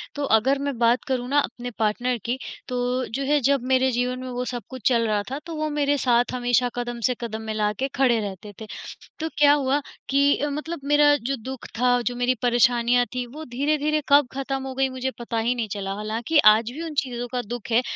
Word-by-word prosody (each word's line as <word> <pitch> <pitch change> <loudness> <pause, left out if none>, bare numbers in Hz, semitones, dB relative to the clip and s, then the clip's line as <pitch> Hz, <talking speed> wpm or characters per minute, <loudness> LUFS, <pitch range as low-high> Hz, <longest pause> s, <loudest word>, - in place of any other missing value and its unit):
तो 290 - -3
अगर 265 +5 +2
मैं 280 -3 -3
बात 235 +1 +3
करूँ 250 -2 -1
ना 290 +1 +4
अपने 245 -2 -4
पार्टनर 240 +3 0
की, 245 +2 -1 0.3
तो 250 0 -1
जो 275 +4 -3
है 295 +1 +3
जब 280 -2 +2
मेरे 260 0 +3
जीवन 250 +1 -1
में 255 0 -6
वो 250 0 -3
सब 245 -4 -4
कुछ 260 -4 -3
चल 230 -2 +2
रहा 210 -1 +1
था, 275 - -3
तो 330 -2 -6
वो 310 0 -1
मेरे 290 -1 +1
साथ 245 -2 +2
हमेशा 245 0 +1
कदम 240 -1 -4
से 250 - -1
कदम 220 -1 -4
मिलाके 215 +3 -1
खड़े 250 -4 +3
रहते 205 0 -6
थे। 220 - -7 0.5
तो 320 - -1
क्या 290 -1 +7
हुआ 285 0 +2 0.3
कि 280 +1 +4
अ, 295 - -1
मतलब 305 +2 -4
मेरा 290 0 +5
जो 270 +2 -3
दुःख 265 0 -7
था, 245 0 +3
जो 245 0 -2
मेरी 245 +1 +1
परेशानियाँ 245 0 +3
थीं 250 -1 -2
वो 315 +1 -7
धीरे-धीरे 300 +2 +1
कब 285 -2 +5
ख़त्म 270 0 -3
हो 265 - -5
गई 270 0 +1
मुझे 260 0 -3
पता 235 -1 -3
ही 235 +3 +1
नहीं 230 -3 -3
चला, 195 -1 -4
हालाँकि 225 +8 -1 0.2
आज 225 +2 -2
भी 320 +5 -6
उन 320 -2 -5
चीज़ों 245 -1 -5
का 250 - -1
दुःख 240 +1 -7
है, 240 +3 +4
250 Hz, 225 wpm, -24 LUFS, 235-275 Hz, 0.5 s, क्या